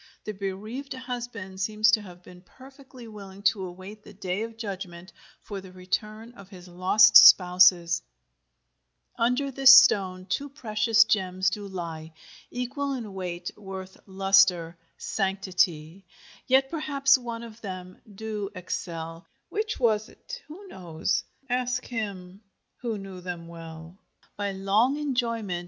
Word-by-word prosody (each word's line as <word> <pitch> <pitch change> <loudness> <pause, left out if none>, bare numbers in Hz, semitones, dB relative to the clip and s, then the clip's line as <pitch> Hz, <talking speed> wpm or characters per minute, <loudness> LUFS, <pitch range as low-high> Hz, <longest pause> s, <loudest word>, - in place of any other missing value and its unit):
The 215 - -3
bereaved 210 +8 -6
husband 240 -7 -6
seems 215 +2 +3
to 215 0 +3
have 180 -3 -13
been 180 0 -14
perfectly 260 +3 -15
willing 200 -2 -11
to 200 -1 +2
await 185 +4 -10
the 210 - -15
Day 185 0 -3
of 225 0 -6
Judgment 190 -5 -7 0.3
for 200 -2 -7
the 190 -1 -13
return 215 +5 -4
of 200 -5 -14
his 185 -2 -13
lost 185 +5 +4
spouses: 180 -2 +7 1.2
Under 250 +4 +1
this 270 0 +9
stone 190 -9 +4
two 285 +8 -3
precious 225 -4 +2
gems 185 -4 0
do 205 +1 -5
ly 165 -4 -7 0.4
Equall 275 +3 -3
in 225 -6 -6
weight, 180 -2 -5
worth, 190 -2 -9
lustre, 190 -3 +3 0.2
sanctity: 185 -3 -1 0.4
Yet 265 +1 +3
perhaps 280 -4 +2
one 235 -2 -5
of 230 -1 -12
them 185 -2 -8
do 210 -1 -5
excell; 165 -2 -6 0.2
Which 430 +1 -3
was't 235 - -2
who 385 +7 -11
knows? 170 - -2 0.2
ask 250 0 -1
him 200 -5 -6 0.4
y^t 225 -4 -2
knew 190 -2 -9
y^{em} 175 -2 -6
well 165 +1 -11 0.4
By 205 -1 -2
long 205 +8 +1
enjoyment. 230 -10 -2
200 Hz, 130 wpm, -26 LUFS, 185-235 Hz, 1.2 s, this